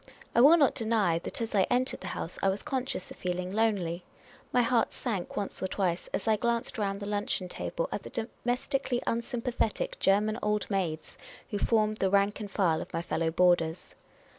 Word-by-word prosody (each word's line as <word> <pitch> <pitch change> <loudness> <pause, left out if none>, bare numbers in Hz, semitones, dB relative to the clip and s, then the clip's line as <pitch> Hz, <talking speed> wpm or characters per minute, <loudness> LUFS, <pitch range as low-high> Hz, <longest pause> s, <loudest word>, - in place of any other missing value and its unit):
I 235 - +5
will 305 +6 +8
not 280 -5 +4
deny 220 -8 +1
that 240 - -3
as 225 -1 -3
I 195 -3 +3
entered 250 +1 +1
the - - -6
house 165 - -5
I 195 - +3
was 195 +1 -2
conscious 260 -7 -3
of - - -10
feeling 180 +1 -3
lonely; 195 -6 0 0.5
my 245 - +4
heart 235 0 +2
sank 205 -8 -4
once 200 - -3
or 190 - 0
twice 185 -3 -1
as - - -2
I 220 -1 +4
glanced 235 +1 -1
round 200 -1 -1
the - - -4
luncheon 205 -2 -1
table - - -3
at - - -3
the - - -9
domestically 245 +2 -2
unsympathetic 245 - -1
German 210 +3 +2
old 210 0 0
maids 170 -5 -2 0.3
who 205 - -1
formed 215 -1 +2
the 190 - +1
rank 200 +2 +2
and 210 -2 -5
file 180 -5 +1
of - - -8
my 165 - -2
fellow 165 -1 0
boarders. 170 -1 +2
210 Hz, 190 wpm, -29 LUFS, 185-235 Hz, 0.5 s, will